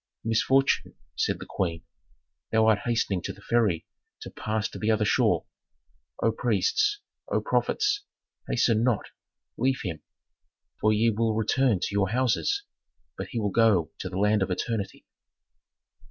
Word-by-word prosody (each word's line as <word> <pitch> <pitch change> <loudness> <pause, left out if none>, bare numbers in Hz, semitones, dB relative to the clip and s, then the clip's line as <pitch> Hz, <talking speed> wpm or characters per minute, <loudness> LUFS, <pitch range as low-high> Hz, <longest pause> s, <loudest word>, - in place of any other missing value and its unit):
"Misfortune," 130 +5 +2 0.2
said - - 0
the - - -8
queen, 85 -4 -2 0.7
"thou 110 0 +4
art 110 -2 +4
hastening 110 -6 0
to - - -4
the 100 - -17
ferry 110 -9 +1 0.4
to - - -8
pass 110 0 -2
to - - -9
the 110 - 0
other 110 -1 +2
shore! - - +2 0.8
O 115 - +4
priests, 125 - +1 0.3
O - - +1
prophets, 415 -1 0 0.5
hasten 115 -1 +2
not, 120 -4 0 0.5
leave 130 +2 +1
him; 80 -6 -4 0.8
for 110 - +3
ye 110 +2 +3
will 110 0 0
return 110 0 +2
to - - -1
your 100 -2 +1
houses, 130 - +1 0.5
but - - -5
he 120 - -3
will 105 -2 -1
go 95 -8 +3
to 95 - -4
the 95 - -5
land 105 +1 +3
of 95 - 0
eternity." 100 +2 -3
110 Hz, 150 wpm, -27 LUFS, 100-120 Hz, 0.8 s, thou